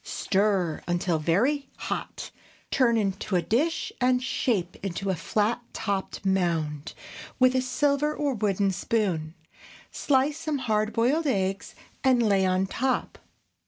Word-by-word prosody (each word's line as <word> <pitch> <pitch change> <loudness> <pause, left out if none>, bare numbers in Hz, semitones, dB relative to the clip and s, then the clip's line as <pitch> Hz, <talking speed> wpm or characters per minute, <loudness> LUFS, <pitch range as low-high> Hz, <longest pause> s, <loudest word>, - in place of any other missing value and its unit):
Stir 190 -5 0
until 175 -1 0
very 255 - +1
hot, - - -5 0.4
turn 235 -3 +3
into 195 -2 -1
a 175 - +3
dish 310 +9 0
and 250 0 +3
shape 235 -7 -1
into 195 +1 -2
a - - 0
flat 210 +8 0
topped 200 -2 -3
mound 165 -6 -1 0.4
with 255 0 +4
a 255 - +3
silver 280 +3 +1
or 295 -2 -1
wooden 200 -3 +1
spoon; 180 -5 -1 0.6
slice 285 +2 +1
some 310 -3 -2
hard 215 -4 0
boiled 275 +9 +1
eggs 195 -5 -1 0.3
and 255 -3 +4
lay 195 -3 +3
on 185 +1 +2
top. 255 +7 -2
215 Hz, 130 wpm, -26 LUFS, 190-260 Hz, 0.6 s, with